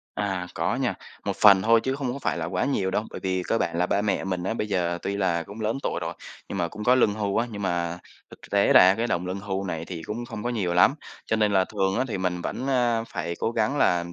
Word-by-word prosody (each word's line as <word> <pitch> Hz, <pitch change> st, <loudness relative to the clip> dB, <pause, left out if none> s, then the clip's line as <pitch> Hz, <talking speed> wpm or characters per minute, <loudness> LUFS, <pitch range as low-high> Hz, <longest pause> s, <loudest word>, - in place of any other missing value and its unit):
À, 95 Hz, -3 st, -2 dB
có -, -, 0 dB
nha, -, -, 0 dB, 0.3 s
một -, -, -2 dB
phần 100 Hz, -3 st, +7 dB
thôi 115 Hz, +1 st, +5 dB
chứ 130 Hz, -, -1 dB
không 130 Hz, -3 st, -2 dB
có 140 Hz, -, -5 dB
phải -, -, -1 dB
là 80 Hz, -, -2 dB
quá 90 Hz, +4 st, -1 dB
nhiều 100 Hz, -9 st, 0 dB
đâu, 105 Hz, -, -1 dB
bởi -, -, -7 dB
vì 95 Hz, -1 st, -1 dB
cơ 115 Hz, -, +2 dB
bản 85 Hz, -, -1 dB
là 90 Hz, -, +2 dB
ba 100 Hz, +2 st, +1 dB
mẹ 105 Hz, -2 st, 0 dB
mình 90 Hz, -2 st, -2 dB
á, 110 Hz, -, -1 dB
bây 105 Hz, -, -2 dB
giờ 85 Hz, -3 st, 0 dB
tuy 100 Hz, -, -2 dB
là 90 Hz, -4 st, +1 dB
cũng 100 Hz, +6 st, -10 dB
lớn 110 Hz, +5 st, -1 dB
tuổi -, -, -1 dB
rồi, -, -, -4 dB, 0.3 s
nhưng 100 Hz, -, -4 dB
mà 85 Hz, -2 st, 0 dB
cũng 105 Hz, +2 st, -7 dB
có 125 Hz, -, +5 dB
lương 115 Hz, -5 st, +3 dB
hưu 100 Hz, -2 st, -1 dB
á. 120 Hz, -, +2 dB
Nhưng 100 Hz, -2 st, -6 dB
mà 85 Hz, -1 st, -1 dB, 0.3 s
thực -, -, -14 dB
tế -, -, +4 dB
ra 95 Hz, +1 st, +8 dB
cái 115 Hz, +3 st, -1 dB
đồng 90 Hz, -5 st, -1 dB
lương 95 Hz, +2 st, -4 dB
hưu 95 Hz, -1 st, -3 dB
này 85 Hz, -3 st, -4 dB
thì 85 Hz, -2 st, -7 dB
cũng 115 Hz, +7 st, -5 dB
không 115 Hz, -3 st, -7 dB
có 120 Hz, -, 0 dB
nhiều 95 Hz, -7 st, -1 dB
lắm, 90 Hz, +10 st, +5 dB, 0.3 s
cho 110 Hz, -, +1 dB
nên 105 Hz, -1 st, +2 dB
là 95 Hz, -1 st, +4 dB
thường 95 Hz, +1 st, -1 dB
á, 130 Hz, -, +2 dB
thì 105 Hz, -, -3 dB
mình 90 Hz, -1 st, -1 dB
vẫn, 130 Hz, -, -4 dB
a, 120 Hz, -3 st, +2 dB
phải 90 Hz, -5 st, -4 dB
cố -, -, 0 dB
gắng 115 Hz, +4 st, 0 dB
là -, -, +4 dB
làm 85 Hz, 0 st, -4 dB
100 Hz, 290 wpm, -25 LUFS, 90-115 Hz, 0.3 s, ra